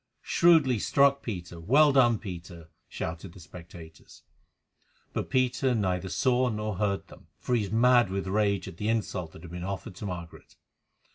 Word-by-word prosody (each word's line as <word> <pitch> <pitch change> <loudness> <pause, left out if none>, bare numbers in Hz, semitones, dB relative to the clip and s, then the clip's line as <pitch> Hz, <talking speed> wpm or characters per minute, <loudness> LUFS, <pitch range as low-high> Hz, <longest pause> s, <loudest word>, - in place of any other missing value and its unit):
"Shrewdly 155 -9 +4
struck, 140 +4 +3
Peter! 90 -6 -6
Well 140 - +4
done, 120 -4 +4
Peter!" 85 -5 -9 0.2
shouted 85 +2 -6
the 95 - -14
spectators. 85 -2 -13 0.9
But - - -3
Peter 130 0 +1
neither 95 -3 -1
saw 125 +2 +1
nor 105 -3 -3
heard 100 -1 -1
them, - - -16
for 125 - -3
he 120 - +3
was 100 -2 -5
mad 120 -1 +4
with 95 0 -3
rage 100 0 0
at 80 - -9
the 105 +3 -2
insult 100 -7 -2
that 80 - -13
had 85 - -10
been 90 0 -6
offered 95 0 -5
to 105 - -5
Margaret. 85 -2 -9
100 Hz, 165 wpm, -28 LUFS, 90-125 Hz, 0.9 s, Shrewdly